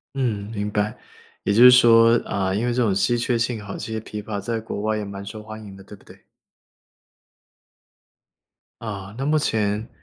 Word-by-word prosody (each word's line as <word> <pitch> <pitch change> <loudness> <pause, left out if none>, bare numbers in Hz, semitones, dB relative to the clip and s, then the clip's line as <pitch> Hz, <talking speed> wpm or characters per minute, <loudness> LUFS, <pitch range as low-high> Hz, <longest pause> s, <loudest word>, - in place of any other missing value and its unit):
嗯， 110 -6 -2
明 105 -1 -3
白。 105 +1 -1 0.5
也 100 - +1
就 120 +4 +6
是 125 - +11
说， 115 -2 +6
呃， 95 -1 -1
因 110 +4 -1
为 120 - 0
这 125 - 0
种 105 -4 +2
稀 120 +5 +1
缺 120 0 0
性 115 -2 -2
吼， 100 - -7
其 110 - -6
实 110 - -3
琵 105 -1 -7
琶 105 -2 -4
在 115 +1 -3
国 110 -2 -6
外 110 0 0
也 105 - -4
蛮 100 0 -7
受 105 +1 -8
欢 110 0 -9
迎 100 -2 -11
的， 95 - -13
对 105 - -12
不 - - -23
对？ - - -16 2.6
啊， 100 -2 -7
那 135 - -3
目 155 +1 +2
前， 110 -5 -1
110 Hz, 215 characters per minute, -22 LUFS, 100-115 Hz, 2.6 s, 是